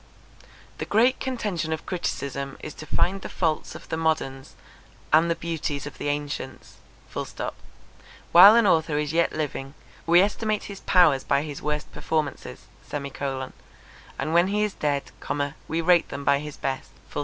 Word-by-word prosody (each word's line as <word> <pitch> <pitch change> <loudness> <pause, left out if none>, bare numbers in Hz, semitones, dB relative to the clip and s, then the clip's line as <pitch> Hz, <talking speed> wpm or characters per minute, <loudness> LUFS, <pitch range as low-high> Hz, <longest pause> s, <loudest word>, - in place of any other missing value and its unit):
The - - -2
great 240 +5 +3
contention 210 -11 -2
of 160 - -3
criticism 140 -6 -3
is 155 - -7
to 155 - -10
find 195 +2 +1
the - - -6
faults 160 -3 -1
of - - -10
the 160 - -2
moderns 140 -5 -1 0.6
and 160 +2 +5
the 170 - +2
beauties 160 -4 -3
of 145 - -9
the - - -3
ancients. 145 -2 -4 1.5
While 195 +5 +10
an 235 -2 +5
author 160 -5 +3
is 150 0 -1
yet 170 0 +3
living, 140 -2 -4 0.3
we 170 +2 +7
estimate 210 +1 0
his 200 -1 -8
powers 165 -8 +4
by 140 +1 +1
his 145 -3 -7
worst 150 0 -3
performances; 155 -3 -3 0.3
and 140 -2 -4 0.8
when 175 +2 +5
he 210 +2 +1
is 210 -2 -1
dead, 145 -2 -2 0.6
we 165 +1 -1
rate 175 0 +4
them 140 - -6
by 140 0 +4
his 150 0 -7
best. 135 -1 -3
155 Hz, 155 wpm, -25 LUFS, 140-180 Hz, 1.5 s, While